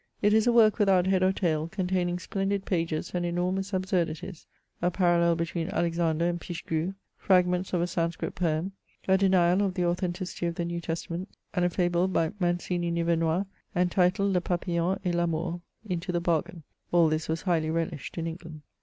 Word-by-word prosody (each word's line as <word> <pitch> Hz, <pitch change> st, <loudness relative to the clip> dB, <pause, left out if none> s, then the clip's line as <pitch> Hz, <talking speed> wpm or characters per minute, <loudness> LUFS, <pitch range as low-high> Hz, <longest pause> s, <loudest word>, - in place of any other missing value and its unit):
It 210 Hz, 0 st, +3 dB
is 220 Hz, +2 st, +4 dB
a -, -, +6 dB
work 225 Hz, -2 st, +5 dB
without 190 Hz, -3 st, +4 dB
head 190 Hz, -1 st, +2 dB
or 185 Hz, 0 st, +4 dB
tail, 160 Hz, -5 st, 0 dB
containing 180 Hz, -1 st, -1 dB
splendid 195 Hz, +1 st, -2 dB
pages 165 Hz, -4 st, -1 dB
and 175 Hz, -1 st, -1 dB
enormous 180 Hz, +3 st, -1 dB
absurdities 185 Hz, -3 st, -2 dB, 0.2 s
— -, -, -45 dB
a 175 Hz, -, +3 dB
parallel 170 Hz, -2 st, +3 dB
between 165 Hz, +1 st, -2 dB
Alexander 170 Hz, -3 st, 0 dB
and 175 Hz, -1 st, -2 dB
Pichegru, 170 Hz, +1 st, -3 dB, 0.2 s
fragments 180 Hz, -1 st, +2 dB
of 180 Hz, -, +1 dB
a -, -, +2 dB
Sanscrit 170 Hz, -1 st, -2 dB
poem, 170 Hz, +1 st, -1 dB, 0.4 s
a 190 Hz, -, +5 dB
denial 185 Hz, -1 st, +4 dB
of 195 Hz, -2 st, 0 dB
the 180 Hz, -, +1 dB
authenticity 175 Hz, 0 st, -2 dB
of 170 Hz, -, -3 dB
the 175 Hz, -2 st, -2 dB
New 170 Hz, 0 st, -3 dB
Testament, 170 Hz, +3 st, -4 dB, 0.2 s
and 180 Hz, -, +1 dB
a -, -, +3 dB
fable 175 Hz, 0 st, +1 dB
by 165 Hz, -4 st, +1 dB
Mancini 175 Hz, -1 st, 0 dB
Nivemois, 170 Hz, +1 st, +1 dB, 0.3 s
entitled 180 Hz, +2 st, +2 dB
Le 180 Hz, -, +2 dB
Papillon 175 Hz, +1 st, -1 dB
et 180 Hz, -, +1 dB
l' 170 Hz, -, +1 dB
Amour, 170 Hz, +1 st, -1 dB, 0.3 s
into 180 Hz, -1 st, -2 dB
the 175 Hz, -, 0 dB
bargain. 170 Hz, -1 st, -1 dB, 0.3 s
All 170 Hz, -2 st, +5 dB
this 155 Hz, 0 st, -1 dB
was 160 Hz, 0 st, -2 dB
highly 165 Hz, -4 st, +1 dB
relished 165 Hz, -1 st, -3 dB
in 165 Hz, -, -2 dB
England. 160 Hz, -2 st, -7 dB
175 Hz, 180 wpm, -28 LUFS, 170-185 Hz, 0.4 s, a